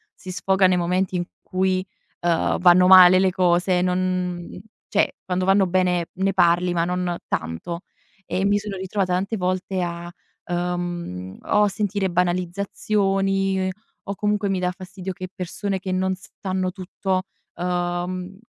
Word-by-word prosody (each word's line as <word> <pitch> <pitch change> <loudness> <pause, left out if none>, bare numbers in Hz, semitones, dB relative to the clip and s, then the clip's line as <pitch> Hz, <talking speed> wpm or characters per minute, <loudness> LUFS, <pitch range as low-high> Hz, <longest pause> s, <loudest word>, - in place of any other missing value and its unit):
si 185 - -8
sfoga 190 +1 +2
nei 185 -1 +4
momenti 180 +2 0
in 175 -1 -1 0.2
cui, 185 0 0 0.4
uhm, 170 -1 +1
vanno 180 0 +6
male 185 -1 +9
le 190 -1 +3
cose, 180 0 +2
non 180 -1 -1 0.3
cioè 205 - +1
quando 185 0 -1
vanno 195 0 +4
bene 180 -1 +1
ne 195 +1 0
parli, 175 -1 +3
ma 170 -1 +1
non 180 -1 -1
tanto. 85 - -3 0.4
E 190 +2 -1
mi 200 +1 +3
sono 205 -1 -5
ritrovata 190 0 -1
tante 195 +5 -1
volte 185 0 -1
a, 175 0 -5 0.3
uhm, 175 - -3
o 210 - +2
a - - +4
sentire 200 -1 -1
banalizzazioni 195 +2 0 0.4
o 200 - -4
comunque 210 0 0
mi 195 - 0
dà 180 0 0
fastidio 185 0 -7
che 185 +1 -7
persone 190 +2 -3
che 185 0 -4
non 185 0 0
sanno 185 0 -4
tutto, 185 0 -2 0.3
uhm, 180 +1 -2
185 Hz, 145 wpm, -23 LUFS, 175-190 Hz, 0.4 s, male